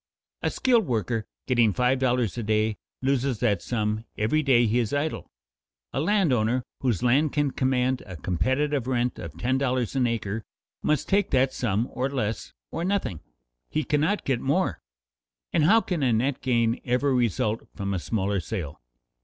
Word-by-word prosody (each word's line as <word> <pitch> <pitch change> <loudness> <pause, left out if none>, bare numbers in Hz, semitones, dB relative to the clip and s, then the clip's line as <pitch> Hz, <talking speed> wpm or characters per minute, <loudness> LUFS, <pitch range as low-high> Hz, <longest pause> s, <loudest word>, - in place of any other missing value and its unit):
A - - +1
skilled 235 -7 +2
worker 115 -1 -1 0.2
getting 120 -5 +3
five 125 +5 +2
dollars 125 -4 +1
a 120 - -3
day 110 0 +1 0.3
loses 135 -3 +1
that 105 -7 +2
sum 110 -2 -1
every 115 +9 +2
day 130 -5 +4
he 115 +2 +2
is 115 0 -1
idle. 150 +2 -2 0.6
A - - 0
landowner 130 - +2 0.2
whose 120 -7 0
land 135 +5 +3
can 145 -2 +1
command 130 -1 +1
a 90 - -7
competitive 130 - 0
rent 125 -1 0
of - - -8
ten 130 +2 0
dollars 130 -2 0
an 130 -2 +3
acre 110 -2 -2 0.4
must 150 -3 0
take 200 +1 +2
that 130 0 +2
sum 115 0 0
or 130 +2 -1
less, 115 -6 -3 0.2
or 165 - -3
nothing; 180 - -1 0.5
he 155 - 0
cannot 155 +8 +1
get 130 -3 0
more. 165 +8 0 0.7
How 205 +9 +5
can 180 -7 -2
a 130 -3 +3
net 125 +5 0
gain 120 -2 +1
ever 130 +2 +1
result 115 -2 0
from 100 -1 -2
a 95 - -1
smaller 100 +1 -1
sale? 85 -5 -5
125 Hz, 165 wpm, -26 LUFS, 110-140 Hz, 0.7 s, How